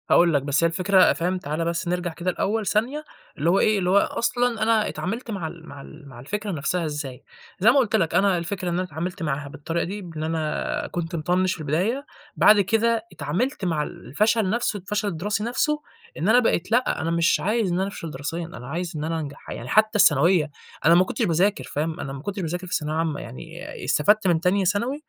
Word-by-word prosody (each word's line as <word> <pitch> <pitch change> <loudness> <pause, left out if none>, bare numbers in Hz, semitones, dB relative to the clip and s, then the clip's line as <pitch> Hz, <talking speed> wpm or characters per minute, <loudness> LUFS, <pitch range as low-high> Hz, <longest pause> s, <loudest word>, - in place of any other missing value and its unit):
هاقول 170 -1 +5
لك 140 - +3
بس 145 +3 +1
هي - - +6
الفكرة 185 +3 +4
فاهم، 180 +2 -1
تعالَ 155 0 -3
بس 170 +1 -2
نرجع 175 -1 -1
كده 175 +2 -2
الأول 210 +4 -1
ثانية، 240 +10 0 0.3
اللي 155 +4 +1
هو 190 - +4
إيه، 215 -1 +3
اللي 180 -1 0
هو 195 - +5
أصلًا 235 +2 +1
أنا 220 -1 +3
اتعاملت 230 +5 -4
مع 190 -6 -3
ال 165 +1 -11
مع 140 - -9
ال 150 +1 -13
مع 125 -2 -12
الفكرة 205 - -4
نفسها 170 +2 -1
إزاي، 145 -4 -5 0.4
زي 205 +5 +6
ما 275 - +2
قُلت 235 -5 +2
لك 165 -7 +1
أنا 195 -2 +4
الفكرة 180 +2 -3
إن - - -1
أنا 180 +2 0
اتعاملت 180 +2 -5
معاها 145 -2 -2
بالطريقة 165 +4 -3
دي، 205 +4 -5
بإن 165 -4 -6
أنا 160 -1 -2
كنت 170 0 -3
مِطَنِّش 180 +3 +1
في - - -9
البداية، 185 - -1 0.3
بعد 210 0 +6
كده 225 +3 +1
اتعاملت 185 - -2
مع 160 -4 0
الفشل 210 - 0
نفسُه، 225 0 0
الفشل 205 +2 -2
الدِّراسي 200 +3 -2
نفسُه، 300 +6 0 0.4
إن 170 +6 0
أنا 245 +3 +7
بقيت 215 -5 0
لأ، 245 +3 +2
أنا 165 +1 -1
مش 170 +1 +3
عايز 215 -1 0
إن 175 - 0
أنا 190 - 0
أفشل 170 -5 -7
دراسيًّا، 150 +5 -4
أنا 125 -7 -10
عايز 170 +4 -3
إن 150 - -3
أنا 165 +1 -1
أنجح، 145 -2 -8
يعني 120 - -6
حتى 215 +3 +3
الثانوية، 160 -1 +4 0.4
أنا 165 +2 +7
ما 180 - +6
كُنتش - - -5
باذاكر 185 +5 +1
فاهم، 155 +2 -3
أنا 135 - -5
ما 135 - -7
كُنتش 195 +4 -4
باذاكر 175 +2 -4
في - - -6
ثانوية 150 0 -1
عامة، 160 -3 -1
يعني 165 +9 -9
آآ - - -8
استفدت 205 +7 +3
من 170 -2 +3
تانية 190 +2 +2
ثانوي، 210 +8 0
180 Hz, 220 wpm, -24 LUFS, 160-205 Hz, 0.4 s, أنا